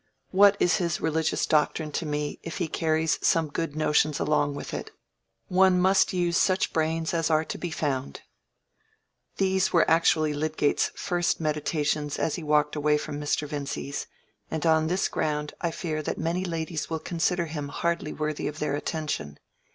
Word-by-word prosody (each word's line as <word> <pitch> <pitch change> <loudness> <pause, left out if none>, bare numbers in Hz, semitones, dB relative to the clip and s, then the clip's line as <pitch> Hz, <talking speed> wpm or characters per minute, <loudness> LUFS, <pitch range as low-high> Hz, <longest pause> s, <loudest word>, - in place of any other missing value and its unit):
"What 200 +1 +6
is 175 - +3
his 170 -3 -1
religious 160 0 0
doctrine 155 0 +1
to 160 - -3
me, 150 0 -3
if 165 - -6
he 175 - -1
carries 160 0 0
some 165 -2 +2
good 155 0 -3
notions 155 -1 +2
along 145 -1 +1
with - - -7
it? - - -4 0.6
One 185 0 +4
must 190 +2 +4
use 175 -2 +1
such 185 -1 +2
brains 160 +1 0
as 165 -1 +1
are 155 0 +2
to - - -5
be 175 - -3
found." 135 - -3 1.2
These 190 -1 +2
were 170 - +4
actually 160 -2 +3
Lydgate's 150 0 +1
first 175 -2 0
meditations 150 -1 -1
as 160 - 0
he 175 - -4
walked 150 -1 +2
away 150 0 +2
from 150 0 -5
Mr. 150 0 -1
Vincy's, 140 -1 -4 0.4
and 160 0 -3
on 160 -1 +4
this 180 +4 +1
ground 150 -1 -2
I 170 - +1
fear 160 -2 -3
that - - -3
many 175 +3 -1
ladies 160 -3 -3
will 165 - -1
consider 170 +1 -1
him 150 -3 -5
hardly 170 +1 -2
worthy 155 -1 -3
of 150 - -5
their 150 -2 -1
attention. 150 - -3
160 Hz, 170 wpm, -27 LUFS, 150-170 Hz, 1.2 s, What